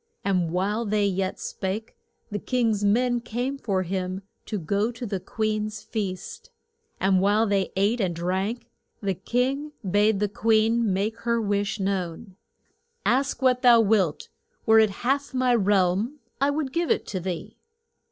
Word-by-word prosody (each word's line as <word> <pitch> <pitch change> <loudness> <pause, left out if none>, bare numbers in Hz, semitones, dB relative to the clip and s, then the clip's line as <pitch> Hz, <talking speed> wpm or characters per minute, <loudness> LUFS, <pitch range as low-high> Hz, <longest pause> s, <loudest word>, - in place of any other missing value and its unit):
And 185 -4 +1
while 200 +6 0
they 210 -1 +1
yet 190 -1 -1
spake 205 +3 -4 0.4
the 205 - -2
king's 225 -5 0
men 240 +4 +2
came 245 +4 -3
for 195 -6 0
him 185 +1 -3 0.2
to 215 - -2
go 200 +6 0
to 240 +1 -7
the 195 -3 -2
queen's 215 +1 -2
feast. 195 -5 -5 0.5
And 190 -1 +3
while 205 +3 +3
they 200 -3 0
ate 205 +5 +2
and 180 -3 0
drank, 190 +7 -2 0.3
the 200 -2 -1
king 260 - -1
bade 205 +2 +3
the 210 - +1
queen 220 +1 +2
make 200 +4 0
known - - -18
her 235 0 +2
wish. 205 -1 -1 1.3
Ask 265 +2 +1
what 250 -1 +3
thou 240 -2 +7
wilt; 200 -7 +1 0.4
were 220 0 +6
it 220 -1 +5 0.2
half 275 +1 0
my 255 -1 +3
realm, 205 +4 +2 0.2
I 280 - +4
would 285 -2 -2
give 340 -1 0
it - - +1
to 190 - -4
thee. 180 -1 -5
210 Hz, 155 wpm, -25 LUFS, 195-235 Hz, 1.3 s, thou